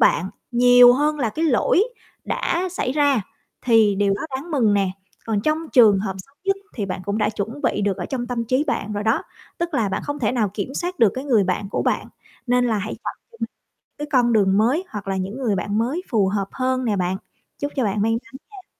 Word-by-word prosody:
bạn 185 Hz, +3 st, +3 dB, 0.2 s
nhiều 245 Hz, 0 st, +7 dB
hơn 300 Hz, +4 st, +1 dB
là 240 Hz, -5 st, +1 dB
cái 320 Hz, +8 st, -2 dB
lỗi 315 Hz, -, +3 dB, 0.4 s
đã 355 Hz, +2 st, -1 dB
xảy 255 Hz, -8 st, -1 dB
ra 285 Hz, -4 st, +3 dB, 0.4 s
thì 225 Hz, -4 st, +4 dB
điều 200 Hz, 0 st, +2 dB
đó -, -, -6 dB, 0.2 s
đáng 300 Hz, +6 st, -8 dB
mừng 235 Hz, -9 st, +3 dB
nè. 195 Hz, -2 st, +1 dB, 0.4 s
Còn 220 Hz, -3 st, 0 dB
trong 305 Hz, +8 st, +1 dB
trường 220 Hz, -7 st, +6 dB
hợp 190 Hz, -1 st, -3 dB
xấu 275 Hz, +9 st, -12 dB
nhất 390 Hz, 0 st, +2 dB, 0.2 s
thì 205 Hz, -4 st, -3 dB
bạn 185 Hz, 0 st, -4 dB
cũng 200 Hz, +3 st, -1 dB
đã 210 Hz, -1 st, +2 dB
chuẩn 225 Hz, +8 st, -5 dB
bị 210 Hz, -, +1 dB
được 200 Hz, -2 st, 0 dB
ở -, -, -4 dB
trong 250 Hz, -3 st, -3 dB
tâm 235 Hz, -1 st, -2 dB
trí 255 Hz, +5 st, +1 dB
bạn 215 Hz, -7 st, -2 dB
rồi 205 Hz, 0 st, -2 dB
đó, 220 Hz, -, +2 dB, 0.4 s
tức 340 Hz, -1 st, -2 dB
là 225 Hz, -6 st, +1 dB
bạn 190 Hz, -, -3 dB
không 290 Hz, 0 st, -4 dB
thể 235 Hz, -4 st, 0 dB
nào 220 Hz, -6 st, 0 dB
kiểm 220 Hz, +6 st, -4 dB
soát 355 Hz, +3 st, -3 dB
được 225 Hz, -5 st, +5 dB
cái 260 Hz, -, -4 dB
người 230 Hz, -8 st, +3 dB
bạn 190 Hz, +2 st, -2 dB
của -, -, -1 dB
bạn, -, -, 0 dB, 0.4 s
nên 250 Hz, 0 st, +3 dB
là 225 Hz, -3 st, +1 dB
hãy 205 Hz, +2 st, -4 dB
chọn -, -, -3 dB, 0.6 s
cho -, -, -59 dB
cái 295 Hz, -, -4 dB
con 245 Hz, -3 st, +4 dB
đường 200 Hz, -3 st, +3 dB
mới, 255 Hz, -, +2 dB
hoặc 205 Hz, -2 st, -7 dB
là 195 Hz, -, -1 dB
những 190 Hz, +6 st, -4 dB
người 235 Hz, -6 st, 0 dB
bạn 205 Hz, +4 st, -1 dB
mới 265 Hz, +11 st, -1 dB
phù 210 Hz, -6 st, +2 dB
hợp 195 Hz, 0 st, -1 dB
hơn 255 Hz, 0 st, -1 dB
nè 215 Hz, -4 st, 0 dB
bạn. 180 Hz, 0 st, 0 dB, 0.4 s
Chúc 285 Hz, 0 st, -3 dB
cho 260 Hz, -, +1 dB
bạn 205 Hz, 0 st, 0 dB
may 225 Hz, -, +2 dB
mắn 230 Hz, 0 st, -4 dB, 0.2 s
nha. 390 Hz, -3 st, -13 dB
230 Hz, 240 wpm, -22 LUFS, 205-270 Hz, 0.6 s, nhiều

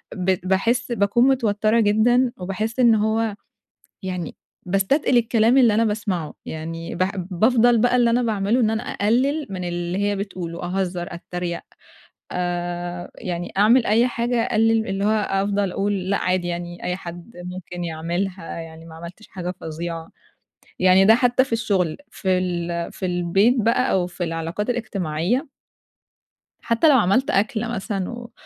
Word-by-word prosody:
ب 185 Hz, 0 st, +1 dB
باحس 235 Hz, +7 st, +1 dB
باكون 235 Hz, +3 st, +3 dB
متوتَّرة 220 Hz, -3 st, +2 dB
جدًا 235 Hz, +4 st, +3 dB
وباحس 205 Hz, +5 st, -3 dB
إن 235 Hz, -3 st, +6 dB
هو 220 Hz, 0 st, 0 dB, 0.7 s
يعني 180 Hz, -3 st, -4 dB, 0.3 s
باستتقِل 220 Hz, -, +2 dB
الكلام 230 Hz, +1 st, +3 dB
اللي 240 Hz, -5 st, +5 dB
أنا 230 Hz, +2 st, +3 dB
باسمعُه، 205 Hz, -7 st, -2 dB
يعني 165 Hz, +1 st, -6 dB
ب -, -, -8 dB, 0.3 s
بافضَل 235 Hz, +5 st, +4 dB
بقى 245 Hz, +2 st, +3 dB
اللي 240 Hz, -1 st, +4 dB
أنا 245 Hz, +1 st, +2 dB
باعملُه 215 Hz, +2 st, +1 dB
إن 220 Hz, -, +3 dB
أنا 220 Hz, +1 st, -1 dB
أقلِّل 265 Hz, +8 st, 0 dB
من 185 Hz, -2 st, -5 dB
اللي 175 Hz, +1 st, -3 dB
هي 205 Hz, 0 st, +1 dB
بتقوله، 185 Hz, -4 st, -5 dB
أهزَّر، 180 Hz, -1 st, -2 dB
أتَّريق، 175 Hz, 0 st, -4 dB, 0.7 s
آآ 175 Hz, 0 st, -3 dB
يعني 175 Hz, -4 st, -5 dB
أعمل 225 Hz, +4 st, +5 dB
أي 230 Hz, +4 st, +4 dB
حاجة، 235 Hz, 0 st, 0 dB
أقلِّل 225 Hz, 0 st, +2 dB
اللي 195 Hz, +1 st, -1 dB
هو -, -, +3 dB
أفضَل 200 Hz, -2 st, 0 dB
أقول 195 Hz, -1 st, -1 dB
لأ، 200 Hz, -, +2 dB
عادي 185 Hz, -1 st, 0 dB
يعني 175 Hz, 0 st, -5 dB
أي 180 Hz, -, -1 dB
حد 175 Hz, +3 st, -9 dB
ممكن 180 Hz, -1 st, -7 dB
يعملها 170 Hz, +3 st, -3 dB
يعني 165 Hz, 0 st, -10 dB
ما 160 Hz, -1 st, -12 dB
عملْتش 170 Hz, +6 st, -11 dB
حاجة 180 Hz, -1 st, -5 dB
فظيعة. 165 Hz, +1 st, -5 dB, 0.7 s
يعني 185 Hz, +1 st, +5 dB
ده 220 Hz, +3 st, +7 dB
حتى 245 Hz, +1 st, +3 dB
في 270 Hz, -, -13 dB
الشغل، 200 Hz, -8 st, 0 dB
في 185 Hz, -2 st, 0 dB
ال 170 Hz, -2 st, -2 dB
في 185 Hz, -, -4 dB
البيت 180 Hz, +6 st, +2 dB
بقى 235 Hz, +3 st, +2 dB
أو 180 Hz, -2 st, +2 dB
في 180 Hz, 0 st, -5 dB
العلاقات 165 Hz, +7 st, -3 dB
الاجتماعية 210 Hz, -, -1 dB, 1.2 s
حتى 235 Hz, +7 st, +3 dB
لو 280 Hz, -, +6 dB
عملت 220 Hz, +5 st, +2 dB
أكلة 215 Hz, +3 st, +1 dB
مثلًا 195 Hz, -2 st, -3 dB
و 235 Hz, 0 st, -8 dB
195 Hz, 150 wpm, -22 LUFS, 175-230 Hz, 1.2 s, ده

